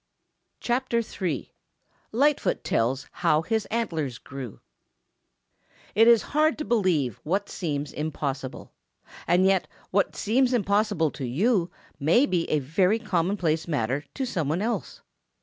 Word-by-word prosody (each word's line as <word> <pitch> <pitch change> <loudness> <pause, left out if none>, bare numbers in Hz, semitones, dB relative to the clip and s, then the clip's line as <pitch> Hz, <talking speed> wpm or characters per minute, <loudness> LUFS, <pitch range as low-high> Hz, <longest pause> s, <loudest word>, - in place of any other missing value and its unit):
CHAPTER 240 -1 0 0.2
III 165 -8 -2 0.6
LIGHTFOOT 280 +5 +2
TELLS 125 +4 0
HOW 155 +1 +2
HIS 220 +1 -1
ANTLERS 160 - -2
GREW 130 -5 -8 1.3
It 225 +3 +5
is 235 -2 +6
hard 310 +1 +3
to 305 - -4
believe 175 - +1
what 195 +6 -1
seems 145 -5 -3
impossible. 140 -3 -4 0.6
And 180 +2 +4
yet 190 -1 +3 0.2
what 200 +1 +1
seems 250 +4 +2
impossible 205 - +2
to 135 - -5
you 180 - +1 0.3
may 165 - +4
be 180 -10 -1
a 155 - +2
very 180 +9 +2
commonplace 175 -6 0
matter 140 -2 -1
to 270 - -1
some 165 - -2
one 170 +6 0
else. 235 +2 -3
180 Hz, 130 wpm, -26 LUFS, 150-225 Hz, 1.3 s, is